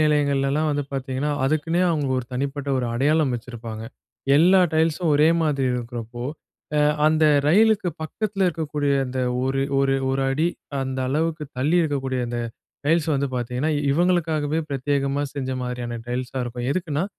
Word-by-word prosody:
நிலையங்கள்லலாம் 145 Hz, 0 st, +2 dB
வந்து 145 Hz, 0 st, 0 dB
பார்த்திங்கன்னா, 135 Hz, +1 st, -2 dB
அதுக்குன்னே 155 Hz, +5 st, +1 dB
அவங்க 150 Hz, -5 st, 0 dB
ஒரு 125 Hz, -, -4 dB
தனிப்பட்ட 140 Hz, +2 st, -3 dB
ஒரு 125 Hz, -, -1 dB
அடையாளம் 145 Hz, +2 st, +2 dB
வச்சிருப்பாங்க. 115 Hz, -2 st, -7 dB, 0.5 s
எல்லா 185 Hz, +4 st, +6 dB
டைல்ஸும் 160 Hz, +1 st, +1 dB
ஒரே 150 Hz, +2 st, +5 dB
மாதிரி 140 Hz, -4 st, +1 dB
இருக்கிறப்போ, 120 Hz, -1 st, -5 dB, 0.5 s
அ -, -, +4 dB, 0.3 s
அந்த 155 Hz, 0 st, +3 dB, 0.2 s
ரயிலுக்கு 205 Hz, +3 st, +4 dB
பக்கத்ல 200 Hz, +4 st, -2 dB
இருக்கக்கூடிய 150 Hz, -4 st, -1 dB
அந்த 130 Hz, +1 st, -3 dB, 0.2 s
ஒரு 135 Hz, +1 st, 0 dB, 0.2 s
ஒரு 135 Hz, 0 st, +2 dB, 0.2 s
1 135 Hz, 0 st, 0 dB
அடி 155 Hz, +5 st, +1 dB, 0.3 s
அந்த 130 Hz, 0 st, -3 dB
அளவுக்கு 155 Hz, +3 st, -1 dB
தள்ளி 150 Hz, +7 st, +2 dB
இருக்கக்கூடிய 135 Hz, -4 st, -1 dB
அந்த 120 Hz, 0 st, -2 dB, 0.5 s
டைல்ஸ் 165 Hz, 0 st, +2 dB
வந்து 140 Hz, 0 st, 0 dB
பார்த்திங்கன்னா, 125 Hz, +5 st, -1 dB, 0.2 s
இவங்களுக்காகவே 160 Hz, -2 st, +1 dB
பிரத்யேகமா 140 Hz, +1 st, 0 dB
செஞ்ச 135 Hz, -2 st, -3 dB
மாதிரியான 120 Hz, -1 st, -4 dB
டைல்ஸாக 125 Hz, +1 st, -3 dB
இருக்கும். 120 Hz, +1 st, -4 dB
எதுக்குன்னா 165 Hz, -2 st, -1 dB
145 Hz, 140 wpm, -23 LUFS, 130-155 Hz, 0.5 s, எல்லா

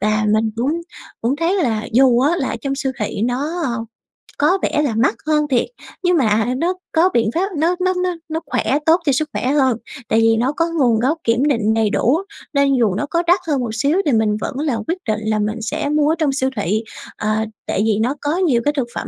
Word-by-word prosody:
Và 215 Hz, +1 st, +1 dB
mình 220 Hz, 0 st, +1 dB
cũng 290 Hz, +8 st, 0 dB, 0.4 s
cũng 250 Hz, +5 st, +1 dB
thấy 335 Hz, +5 st, +1 dB
là 220 Hz, -3 st, -1 dB
dù 250 Hz, -1 st, +5 dB
á 305 Hz, +6 st, +2 dB
là 265 Hz, -, -2 dB
trong 275 Hz, -1 st, -1 dB
siêu 270 Hz, -1 st, -2 dB
thị 210 Hz, -1 st, -3 dB
nó, 285 Hz, +9 st, -1 dB
ờ, 235 Hz, -2 st, -2 dB, 0.5 s
có 330 Hz, +7 st, +3 dB
vẻ 300 Hz, -, +1 dB
là 255 Hz, -7 st, -1 dB
mắc 230 Hz, +1 st, +2 dB
hơn 300 Hz, -1 st, +2 dB
thiệt, 255 Hz, -4 st, +2 dB, 0.4 s
nhưng 355 Hz, -1 st, +3 dB
mà 220 Hz, -4 st, +2 dB
nó 345 Hz, +5 st, 0 dB, 0.2 s
có 340 Hz, +3 st, +4 dB
biện 225 Hz, -2 st, +2 dB
pháp, 385 Hz, +4 st, +1 dB
nó 335 Hz, +4 st, +2 dB
nó 370 Hz, -, +2 dB
nó 360 Hz, -1 st, -1 dB
nó 320 Hz, +1 st, -2 dB
khỏe, 285 Hz, +3 st, 0 dB
tốt 330 Hz, +2 st, +5 dB
cho 280 Hz, -, +3 dB
sức 300 Hz, +3 st, 0 dB
khỏe -, -, -2 dB
hơn 265 Hz, -4 st, +2 dB, 0.3 s
tại 225 Hz, -, +3 dB
vì 225 Hz, 0 st, +4 dB
nó 255 Hz, +4 st, +1 dB
có 330 Hz, +2 st, +1 dB
nguồn 235 Hz, -4 st, +3 dB
gốc 280 Hz, +7 st, +1 dB
kiểm 235 Hz, +3 st, +2 dB
định 225 Hz, -6 st, +1 dB
đầy 220 Hz, -2 st, +2 dB
đủ. 250 Hz, +7 st, +2 dB, 0.4 s
Nên 280 Hz, -1 st, +3 dB
dù 205 Hz, -6 st, +2 dB
nó 255 Hz, -, -1 dB
có 340 Hz, 0 st, 0 dB
đắt 360 Hz, +2 st, +5 dB
hơn 290 Hz, -4 st, +1 dB
một 240 Hz, -, -3 dB
xíu 285 Hz, +9 st, +1 dB
thì 290 Hz, -, +2 dB
mình 215 Hz, -2 st, +2 dB
vẫn -, -, -4 dB
là 285 Hz, -7 st, 0 dB
quyết 345 Hz, -, -1 dB
định 215 Hz, -1 st, 0 dB
là 215 Hz, -1 st, +1 dB
mình 215 Hz, +2 st, -2 dB
sẽ 290 Hz, +6 st, -2 dB
mua 300 Hz, 0 st, +2 dB
ở 320 Hz, -, +2 dB
trong 305 Hz, -4 st, +1 dB
siêu 265 Hz, -1 st, 0 dB
thị, 210 Hz, +2 st, -1 dB, 0.3 s
à, 215 Hz, +1 st, -1 dB, 0.2 s
tại 195 Hz, -, 0 dB
vì 215 Hz, -2 st, +2 dB
nó 255 Hz, +5 st, 0 dB
có 295 Hz, +4 st, -1 dB
nhiều 285 Hz, -11 st, +2 dB
cái 290 Hz, -, +2 dB
thực 245 Hz, -3 st, 0 dB
phẩm -, -, -4 dB
265 Hz, 240 wpm, -19 LUFS, 225-305 Hz, 0.5 s, dù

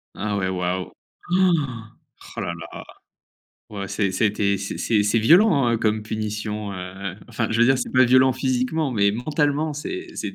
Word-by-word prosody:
Ah 105 Hz, 0 st, -2 dB
ouais, 95 Hz, -, -1 dB
waouh! 90 Hz, 0 st, -2 dB, 0.4 s
Oh! 185 Hz, 0 st, +4 dB, 0.9 s
Oh -, -, -2 dB
là -, -, -3 dB
là! -, -, -9 dB, 0.9 s
Ouais 100 Hz, -2 st, -5 dB
c'est, 95 Hz, -1 st, -1 dB
ça -, -, 0 dB
été 100 Hz, -1 st, 0 dB
c'est 105 Hz, +2 st, 0 dB
c'est 105 Hz, +3 st, +2 dB
violent, 160 Hz, -, +5 dB
hein, 115 Hz, -1 st, +1 dB
comme 110 Hz, -1 st, 0 dB
punition, 105 Hz, -1 st, -4 dB
heu, 95 Hz, +1 st, -6 dB
enfin 115 Hz, -, -2 dB
je 115 Hz, -, 0 dB
veux -, -, +7 dB
dire 130 Hz, 0 st, +3 dB
c'est -, -, -3 dB
pas 130 Hz, 0 st, +6 dB
violent 130 Hz, +2 st, +5 dB
physiquement 130 Hz, +3 st, -1 dB
mais 100 Hz, -2 st, +3 dB
mentalement 145 Hz, +5 st, 0 dB
c'est 365 Hz, -, -6 dB
c'est -, -, -5 dB
110 Hz, 175 wpm, -23 LUFS, 100-135 Hz, 0.9 s, veux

